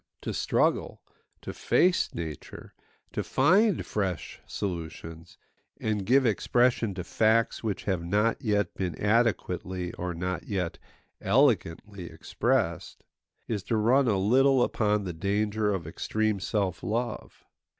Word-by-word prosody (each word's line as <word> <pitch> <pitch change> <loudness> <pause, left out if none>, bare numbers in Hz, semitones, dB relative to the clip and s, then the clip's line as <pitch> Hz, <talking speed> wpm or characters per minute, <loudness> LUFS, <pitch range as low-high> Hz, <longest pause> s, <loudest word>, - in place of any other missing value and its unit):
To - - -4
struggle, - - 0 0.4
to - - -6
face 185 0 +2
nature, 80 -4 -7 0.4
to - - -2
find 200 +1 +3
fresh 95 -6 -3
solutions, 80 -2 -6 0.4
and 105 -3 -2
give 130 +2 +4
expression 120 -1 +2
to 90 - -4
facts 110 +4 +1
which 105 -3 -2
have 95 -4 -1
not 105 +6 +1
yet 105 -3 0
been 90 -3 -3
adequately 95 -5 0
or 90 -1 -4
not 90 +2 -4
yet 95 -5 -3 0.4
elegantly 105 - +1
expressed, 80 0 -2 0.4
is 105 -4 -2
to 115 - 0
run 125 +5 +3
a 105 -4 +2
little 130 +6 +4
upon 105 -3 +1
the 90 -2 -4
danger 105 +4 0
of 95 -5 -3
extreme 110 +5 -1
self 95 -2 -1
love. 115 +1 -4
105 Hz, 125 wpm, -27 LUFS, 90-115 Hz, 0.4 s, give